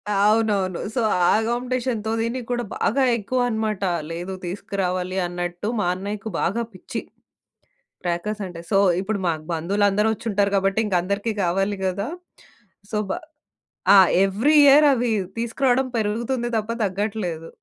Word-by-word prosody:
అవునవును. 205 -3 +2 0.2
సో, 240 - +1 0.3
ఆ - - +5
కాంపిటేషన్‌తో 240 -2 -2
దీనిక్కూడా 240 +1 -2
బాగా 270 +5 +1
ఎక్కువన్నమాట. 220 -2 -1 0.3
లేదు 175 +3 -5
తీసుకురావాలి 185 0 -3
అన్నట్టు, 175 +2 -4
మా 205 - +1
అన్నయ్యకి 205 +3 -5
బాగా 225 +7 0
పిచ్చి 185 - -6 1.0
క్రాకర్సంటే. 175 0 -3
సో, 195 - +4 0.2
ఇప్పుడు 200 0 -2
మాకు 155 -2 -2
బంధువులందరూ 200 +5 +1
వచ్చుంటారు 205 -2 0
గాబట్టింకందరికీ 200 +1 0
కావాలి 195 +3 0
కదా! 200 +6 -2 0.8
సో, 210 - 0
బా 340 - -1 0.8
ఆ! - - +9 0.3
ఎవ్రి 225 +11 +2
ఇయర్ 290 +2 +7
అవి 245 -1 0 0.3
తీసుకురాడం 250 +3 +1
పెరుగుతుంది 235 +3 -1
తప్ప, 215 +1 -3
తగ్గట్లేదు. 190 -4 -3
205 Hz, 110 wpm, -23 LUFS, 190-230 Hz, 1.0 s, ఆ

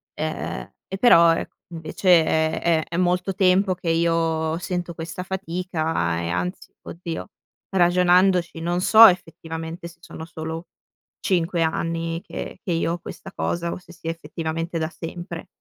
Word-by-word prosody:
Ehm, 155 +1 -4
e 190 - -5
però 170 -7 +7
ec - - -4 0.2
invece 170 +2 +3
è 160 0 +1
è 165 -2 +2
è 170 - -3
molto 180 +1 +1
tempo 185 0 +3
che 175 -1 -4
io 165 -1 +1
sento 175 -1 -3
questa 170 +2 -5
fatica 165 - -2
e 85 - -3
anzi, 90 +1 -3
oddio, 170 +2 -6 0.4
ragionandoci 180 -1 +3
non 175 +2 0
so 220 +3 +9
effettivamente 165 -2 -3
se 170 0 -15
sono 160 -1 -9
solo 160 +1 -6 0.6
5 175 -2 +1
anni 165 +1 -2
che - - -7
che 190 - -3
io 165 0 0
ho 175 - -4
questa 195 - -9
cosa, 170 0 -2
o - - -5
se 180 -1 -16
sia 165 -1 -4
effettivamente 165 +1 -4
da 160 0 -1
sempre. 170 +1 -7
170 Hz, 150 wpm, -23 LUFS, 160-180 Hz, 0.6 s, so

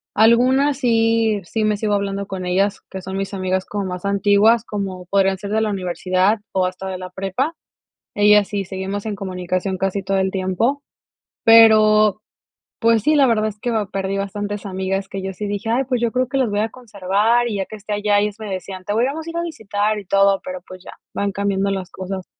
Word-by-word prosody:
Algunas 255 +6 +4
sí, 225 -3 +2
sí 220 +4 -2
me 210 -1 +1
sigo 210 -1 -1
hablando 200 0 -2
con 190 -2 -5
ellas, 195 +3 0
que 190 - -6
son 190 +1 -6
mis 195 +1 -4
amigas 185 0 -1
como 205 -1 -4
más 180 0 -5
antiguas, 205 +3 +3
como 190 -3 -5
podrían 195 0 +2
ser 200 +1 -7
de 220 +1 +1
la 215 - 0
universidad 185 +2 0
o 185 -1 +2
hasta 185 +1 -5
de 185 - -4
la 185 0 -7
prepa. 195 - -2 0.6
Ellas 210 -1 +5
sí, 200 -1 -2
seguimos 195 +2 -5
en 210 -2 -3
comunicación 185 0 -3
casi 195 +1 -1
todo 195 +1 0
el 190 0 0
tiempo, 195 +9 0 0.6
pero 215 -2 +6 0.6
pues 230 -2 +3
sí, 305 +3 +3
la 275 -2 +5
verdad 215 -2 +2
es 210 0 -8
que 240 - -2 0.2
perdí, 195 0 -2
ah - - -1
bastantes 205 +1 -4
amigas 190 +1 -2
que 195 -1 -5
yo 190 0 -4
sí 205 +3 -5
dije: 205 +2 -4
"Ay 250 +3 +2
pues 250 -2 -1
yo 235 -1 0
creo 255 -1 0
que 270 +2 -1
los 255 -4 +2
voy 205 0 0
a 220 - 0
conservar 220 +1 0
y 210 - -3
ya 195 - -2
que - - -10
esté 210 +1 -7
allá", 205 0 +2
y - - +2
ellas 210 -1 -3
me 210 -2 -6
decían: 185 0 -6
"Te 205 - -2
vamos 275 +8 -1
a - - -5
ir 335 - -7
a - - 0
visitar 215 - -2
y 200 - -9
todo", 195 0 +3
pero 185 0 -6
pues 185 0 -11
ya - - -10 0.2
van 200 -1 -1
cambiando 200 0 0
las 190 -2 -4
cosas. 190 0 -6
200 Hz, 220 wpm, -20 LUFS, 190-220 Hz, 0.6 s, pero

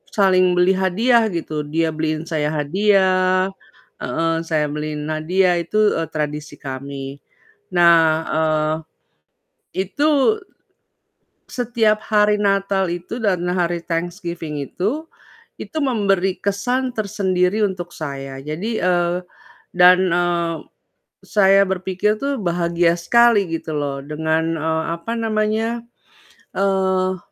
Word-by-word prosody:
saling 185 -3 +4
beli 180 +1 +4
hadiah 220 +5 +2
gitu, 155 -5 -4
dia 160 +1 0
beliin 155 0 -2
saya 155 -3 -2
hadiah 185 +3 +2 0.5
heeh, 165 0 -1
saya 155 -2 +1
beliin 150 0 -4
hadiah, 175 +3 +1
itu, 170 - -10 0.2
eee, 165 0 -2
tradisi 150 -1 -4
kami. 135 +1 -7 0.5
Nah, 170 -1 +6 0.3
eee, 155 0 +1 1.1
itu 295 - +2 1.1
setiap 225 -3 +1
hari 210 -1 +3
Natal 195 -1 +1
itu 175 +7 -5
dan 190 -5 +1
hari 175 -1 -1
Thanksgiving 170 -3 -4
itu, 220 - -3 0.5
itu - - -9
memberi 195 -6 +1
kesan 245 +6 -1
tersendiri 195 -2 0
untuk 180 -3 -4
saya, 135 -3 -6
jadi 155 +10 -4
eee, 175 -1 +1 0.6
dan, 180 0 +7
eee, 170 -1 0 0.7
saya 195 -1 +4
berpikir 190 +3 -1
tuh 280 -1 -1
bahagia 170 -1 +1
sekali 235 +1 +4
gitu 165 -1 -4
loh, 140 -2 -2
dengan, 160 +2 -1
eee, 160 +1 -1 0.2
apa 230 +7 -4
namanya, 220 +1 0 0.8
eee, 190 -1 +1
180 Hz, 110 wpm, -20 LUFS, 160-200 Hz, 1.1 s, dan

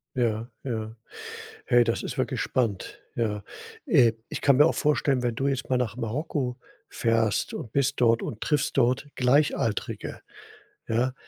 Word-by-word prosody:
Ja, 115 -2 0
ja. 110 -3 -4 0.7
Hey, 120 0 +5
das 115 0 0
ist - - -5
wirklich - - -1
spannend, 115 -7 -1 0.2
ja. 105 -3 -1 0.4
Äh, 140 - +5 0.2
ich - - -5
kann 140 -2 +4
mir 145 +3 +7
auch - - +1
vorstellen, 145 -3 +2
wenn 120 -1 0
du 135 +4 0
jetzt 135 -2 -2
mal 130 - +2
nach 125 -2 -1
Marokko 125 +2 -2 0.3
fährst 115 -1 +1
und 115 - -6
bist 140 -1 +1
dort 115 -1 +4
und 110 - -5
triffst 150 -3 0
dort 125 +3 +2
Gleichaltrige, 125 -4 +1 0.7
ja, 120 +3 +1
125 Hz, 155 wpm, -26 LUFS, 115-135 Hz, 0.7 s, mir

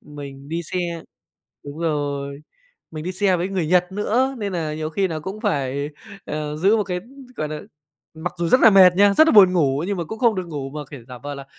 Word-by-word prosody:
mình 140 -2 -10
đi 165 +2 -3
xe 170 -1 -4 0.6
đúng 145 +2 -8
rồi, 145 -3 -2 0.5
mình 155 -1 -7
đi 185 - -3
xe 190 0 +2
với 175 +2 -2
người 190 -4 -1
Nhật 180 +2 +2
nữa 240 +6 0
nên 205 -3 -3
nà 160 -4 -2
nhiều 155 0 -4
khi 190 +4 0
nà 160 -2 -3
cũng 190 +7 -7
phải, 140 - -1 0.3
ờ, 150 0 -4
giữ 195 +7 +3
một 210 - 0
cái, 180 -2 -3 0.4
gọi 155 - -2
nà 150 0 -5 0.5
mặc 160 +3 -4
dù 170 -1 0
rất 255 - +5
là 225 - +8
mệt 185 -2 +7
nha, 200 +1 +5
rất 315 - +6
là - - +4
buồn 195 -4 +8
ngủ 145 -4 +1
nhưng 200 0 -2
mà 170 - -2
cũng 220 +7 -7
không 235 -2 +3
được 185 -2 -4
ngủ 140 -4 -5
mà, 150 - -6
kiểu, 135 -5 -10
giả 125 -1 -9
vờ 145 +3 -6
là 140 -1 -8
170 Hz, 240 wpm, -22 LUFS, 150-190 Hz, 0.6 s, là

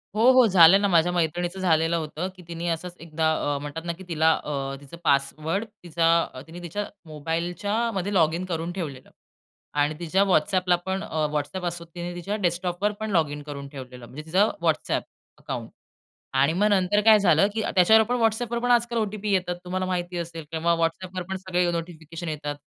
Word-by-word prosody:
हो, 215 - +1
हो. 255 -1 +6
झालं 190 0 +7
ना, 200 - +3
माझ्या 175 -2 +3
मैत्रिणीचं 175 +2 -1
झालेलं 165 -2 +2
होतं, 160 +2 -4
की 180 - -14
तिने 170 0 -5
असंच 175 +2 -3
एकदा 160 -1 0 0.2
अ, - - -1
म्हणतात 145 +3 -6
ना, 170 - -1
की 185 +3 -12
तिला 160 -1 +3
अ, 135 -2 -3
तिचं 145 +4 -11
पासवर्ड 155 +7 +1 0.2
तिचा 165 -4 +1
तिने 165 +2 -9
तिच्या 205 +5 -3 0.2
मोबाईलच्या 165 +5 -3 0.2
मध्ये 195 +1 -2
लॉगिन 170 0 +2
करून 170 -1 -3
ठेवलेलं. 150 -8 -6 0.6
आणि 145 +1 +1
तिच्या 175 +3 +2
WhatsAppला 180 +2 +3
पण, 190 +1 -2
अ, 155 -6 -1
WhatsApp 150 +5 -3
असो 170 0 -4
तिने 175 0 -5
तिच्या 175 +4 -3
डेस्कटॉपवर 180 +2 0
पण 220 -1 -3
लॉगिन 150 -5 +1
करून 140 -1 -7
ठेवलेलं, 125 -3 -10
म्हणजे 145 +6 -9
तिचं 190 +6 +3
WhatsApp 160 -2 +1 0.4
अकाउंट. - - -5 0.6
आणि 140 +4 +3
मग 200 +5 +2
नंतर 200 0 +3
काय 215 0 +7
झालं, 175 -1 +4
की 220 - -1
त्याच्यावर 220 +5 +6
पण 245 - +2
WhatsAppवर 230 +1 0
पण 245 - +2
आजकाल 235 -1 +2
ओ-टी-पी 210 -1 -2
येतात. 180 -2 0
तुम्हाला 185 +1 -2
माहिती 180 -1 -3
असेल 165 -2 -5
किंवा 165 +1 +1
WhatsAppवर 180 +2 -2
पण 190 - -2
सगळे 180 -1 0
नोटिफिकेशन 165 0 -6
येतात. 150 -1 -4
175 Hz, 180 wpm, -25 LUFS, 160-190 Hz, 0.6 s, झालं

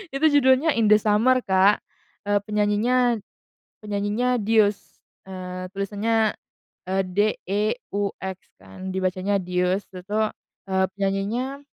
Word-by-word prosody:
itu 285 +3 +1
judulnya 265 +4 +4
In 220 - +3
The 210 - +7
Summer, 215 +5 +3
Kak 190 +2 +3 0.4
e - - 0 0.2
penyanyinya 220 +3 +2 0.6
penyanyinya 210 +4 0
Deux, 210 -2 +3 0.5
eee, 185 -1 -6
tulisannya 210 +2 0 0.5
e - - -1
DEUX 200 0 -2 0.2
kan 95 - -9
dibacanya 185 +1 0
"dius." 180 +1 -1
Itu 185 - -7
tuh, 210 +4 0 0.4
eee, 190 -1 +1
penyanyinya 205 +8 -2
205 Hz, 105 wpm, -24 LUFS, 190-225 Hz, 0.6 s, The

